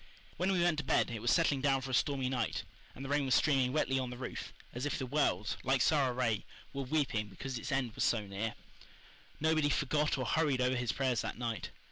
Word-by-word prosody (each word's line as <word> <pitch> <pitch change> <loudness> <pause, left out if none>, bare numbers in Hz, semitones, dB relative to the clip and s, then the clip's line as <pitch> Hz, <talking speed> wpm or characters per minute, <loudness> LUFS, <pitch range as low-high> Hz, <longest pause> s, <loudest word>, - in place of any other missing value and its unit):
When 185 +2 +1
we 180 -3 +2
went 170 -3 +2
to - - -2
bed - - +2
it 110 -2 -4
was 120 - 0
settling 145 -3 +3
down 135 -1 +2
for 130 0 -5
a - - -4
stormy 135 +1 +1
night, 125 -3 -1 0.3
and 135 - -7
the - - -5
rain 145 0 +2
was 130 - +3
streaming 135 -4 +3
wetly 135 -2 +1
on 130 -1 -2
the 125 - -7
roof, 125 0 -6 0.2
as 125 +4 -2
if - - -1
the 130 - -3
world, 120 -7 0
like 135 +1 +2
Sara 140 -1 +3
Ray, 120 -4 0 0.3
were 140 - -3
weeping 130 -6 0
because 125 +4 -6
its 145 - -5
end 130 -4 0
was - - -1
so 110 -3 +2
near. 100 +3 -3 0.8
Nobody 155 -1 +2
forgot 150 +1 +1
or 130 - -2
hurried 150 -5 +1
over 125 +1 +2
his 120 -1 0
prayers 130 -4 0
that - - -4
night. 115 -2 -3
130 Hz, 230 wpm, -33 LUFS, 120-145 Hz, 0.8 s, settling